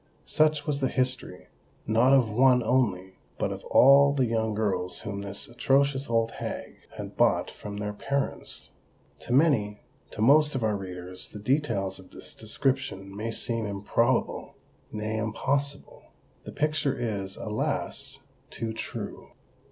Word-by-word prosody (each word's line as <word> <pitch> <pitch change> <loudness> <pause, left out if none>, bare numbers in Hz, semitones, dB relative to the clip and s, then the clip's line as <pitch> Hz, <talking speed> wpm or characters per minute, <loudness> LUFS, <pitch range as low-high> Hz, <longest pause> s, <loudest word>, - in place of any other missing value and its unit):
Such 155 -1 +2
was 145 -2 -1
the 135 - +1
history—not 125 -1 -1
of 135 -4 +5
one 125 +2 +5
only—but 100 -6 -1
of - - -6
all 140 +1 +6
the 135 -3 +2
young 110 -2 0
girls 95 -4 -1
whom 100 -2 -5
this 100 0 -4
atrocious 135 +2 +1
old 115 -1 +2
hag - - -5 0.2
had - - -7
bought - - +2
from 105 -1 -8
their 105 0 -3
parents! 140 +6 -3 0.5
To - - -9
many—to 120 -9 0
most 150 +6 +5
of 130 - -1
our 110 -1 +1
readers, 90 -1 -6
the - - -9
details 105 -6 -1
of 95 - -15
this - - -10
description 110 -4 -2
may 110 +3 -3
seem 115 -1 -1
improbable,—nay, 110 0 -2
impossible. 140 +6 -2 0.4
The - - -7
picture 150 -3 0
is, 100 -5 -3
alas! 105 0 -3 0.3
too 110 -1 -4
true. - - -7
115 Hz, 130 wpm, -27 LUFS, 105-135 Hz, 0.5 s, all